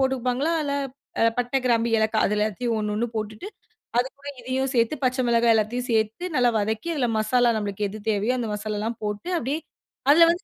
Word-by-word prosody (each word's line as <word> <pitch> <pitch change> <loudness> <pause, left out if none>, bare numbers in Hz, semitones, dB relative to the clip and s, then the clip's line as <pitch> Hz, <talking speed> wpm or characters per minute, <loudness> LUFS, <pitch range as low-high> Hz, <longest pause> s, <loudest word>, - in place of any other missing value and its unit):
போட்டுப்பாங்களா 265 +3 +1
இல்ல 280 - -1 0.7
பட்டை 245 +2 +1
கிராம்பு 235 -2 +2
ஏலக்காய் 220 0 +2
அது 210 - 0
எல்லாத்தையும் 215 +3 0
1 210 -1 -1
1 230 +3 0
போட்டுட்டு, 215 - -4 0.5
அதுக்கூட 275 +3 -2
இதையும் 260 +2 -1
சேர்த்து 235 +4 +2
பச்சை 255 +1 +2
மிளகாய் 235 -1 +4
எல்லாத்தையும் 230 +3 0
சேர்த்து 220 +9 0
நல்லா 245 -1 +4
வதக்கி, 220 +10 -2
அதில 265 -5 +1
மசாலா 240 +3 +3
நம்மளுக்கு 205 -1 -2
எது 215 - -7
தேவையோ 210 +4 +1
அந்த 235 -2 -2
மசாலாலாம் 215 +2 -3
போட்டு, 210 - -3
அப்படியே 275 +2 -1 0.5
அதில 330 +3 +8
வந்து 350 +4 0
235 Hz, 175 wpm, -25 LUFS, 215-255 Hz, 0.7 s, அதில